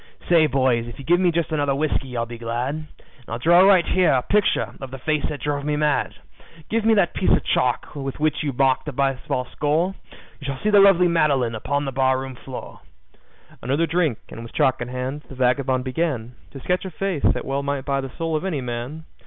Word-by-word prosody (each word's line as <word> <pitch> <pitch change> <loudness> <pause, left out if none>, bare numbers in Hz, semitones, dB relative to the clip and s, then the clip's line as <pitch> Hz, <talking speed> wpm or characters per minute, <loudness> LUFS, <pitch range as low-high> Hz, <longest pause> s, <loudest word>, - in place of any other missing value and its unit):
"Say, 165 -3 +5
boys, 130 -4 +1
if 120 - -9
you 140 - -10
give 175 +4 +4
me 185 -1 +3
just 170 -1 -1
another 145 -3 +1
whiskey 135 -4 -2
I'll 115 - 0
be 120 0 -9
glad, 120 +4 -2
And 155 0 -7 0.4
I'll 115 - -4
draw 170 +8 +5
right 190 -2 +6
here 185 -2 +3
a 130 -2 +2
picture 210 -1 +1
of 135 - -6
the 135 - -7
face 150 +2 -1
that 150 - -6
drove 145 -1 -2
me 150 0 -1
mad. 150 -1 0 0.6
Give 225 0 +1
me 225 0 +4
that 195 -4 +2
piece 190 - 0
of - - +3
chalk 125 -1 0
with 135 -1 -5
which 155 0 +1
you 145 - -1
mark 135 0 +2
the 150 - -5
baseball 135 -1 -1
score 160 +6 0 0.5
You 140 - -10
shall 135 -1 -3
see 215 - +2
the 205 - +7
lovely 195 -3 +6
Madeline 145 -8 +2
upon 140 +6 -2
the 135 - -3
barroon 130 0 0
floor." 130 0 -9 0.8
Another 140 +7 +1
drink, 160 -7 0
and 115 - -9
with 115 - -10
chalk 130 -1 +2
in 120 - -3
hand, 130 +3 -4
the 135 - -9
vagabond 130 0 +1
began 130 -3 -2 0.2
To 135 - -10
sketch 180 +7 -1
a 190 - -5
face 185 -2 -3
that - - +1
well 135 +1 -1
might 140 -1 -3
buy 140 -1 0
the 135 - -6
soul 165 -1 -1
of 155 - -1
any 180 -7 -2
man. 125 +6 -5
140 Hz, 225 wpm, -22 LUFS, 130-165 Hz, 0.8 s, the